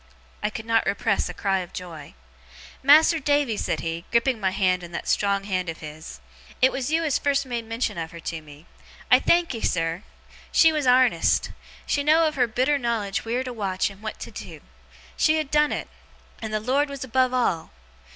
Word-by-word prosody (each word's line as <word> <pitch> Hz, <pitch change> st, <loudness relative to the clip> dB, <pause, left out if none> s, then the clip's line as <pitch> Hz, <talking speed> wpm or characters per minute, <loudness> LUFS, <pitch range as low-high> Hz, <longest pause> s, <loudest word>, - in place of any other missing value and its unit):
I -, -, 0 dB
could 220 Hz, +1 st, -7 dB
not 225 Hz, 0 st, +2 dB
repress 200 Hz, +1 st, 0 dB
a -, -, -6 dB
cry 195 Hz, -1 st, 0 dB
of 180 Hz, -2 st, -8 dB
joy. 165 Hz, -, -9 dB, 0.7 s
'Mas'r 310 Hz, +4 st, +6 dB
Davy!' 285 Hz, -5 st, +1 dB
said -, -, -2 dB
he, 165 Hz, +1 st, -4 dB
gripping 235 Hz, 0 st, +2 dB
my 190 Hz, -2 st, +1 dB
hand 185 Hz, -1 st, +1 dB
in 175 Hz, -1 st, -10 dB
that -, -, -5 dB
strong 200 Hz, -1 st, +1 dB
hand 185 Hz, -3 st, -2 dB
of 165 Hz, -, -5 dB
his, 155 Hz, -, -10 dB, 0.4 s
'it 260 Hz, +1 st, +5 dB
was 265 Hz, +1 st, -3 dB
you 325 Hz, +1 st, +2 dB
as 300 Hz, -5 st, +1 dB
first 280 Hz, -1 st, +1 dB
made 240 Hz, -3 st, -4 dB
mention 225 Hz, -4 st, -2 dB
of 165 Hz, -1 st, -4 dB
her 170 Hz, -, -11 dB
to 165 Hz, -1 st, -5 dB
me. 150 Hz, +1 st, -15 dB, 0.5 s
I -, -, +8 dB
thankee, 335 Hz, -9 st, +1 dB
sir! 165 Hz, +1 st, -1 dB, 0.5 s
She 325 Hz, -, +6 dB
was 300 Hz, -4 st, -1 dB
arnest. 250 Hz, 0 st, +3 dB, 0.3 s
She -, -, 0 dB
had 285 Hz, -, -7 dB
know'd 320 Hz, +1 st, +5 dB
of -, -, -9 dB
her 250 Hz, -4 st, +2 dB
bitter 260 Hz, +6 st, +1 dB
knowledge 230 Hz, -3 st, -2 dB
wheer 240 Hz, +3 st, -1 dB
to 255 Hz, -1 st, -6 dB
watch 195 Hz, -3 st, -1 dB
and 200 Hz, +1 st, -16 dB
what 215 Hz, 0 st, -5 dB
to -, -, -7 dB
do. -, -, -9 dB, 0.6 s
She 310 Hz, 0 st, +3 dB
had 310 Hz, -3 st, -3 dB
done 300 Hz, 0 st, +3 dB
it. -, -, -3 dB, 0.5 s
And 220 Hz, -1 st, -5 dB
the 215 Hz, -, 0 dB
Lord 270 Hz, +6 st, +1 dB
was 280 Hz, -1 st, -6 dB
above 255 Hz, 0 st, +1 dB
all! 235 Hz, -10 st, 0 dB
230 Hz, 205 wpm, -24 LUFS, 185-275 Hz, 0.7 s, I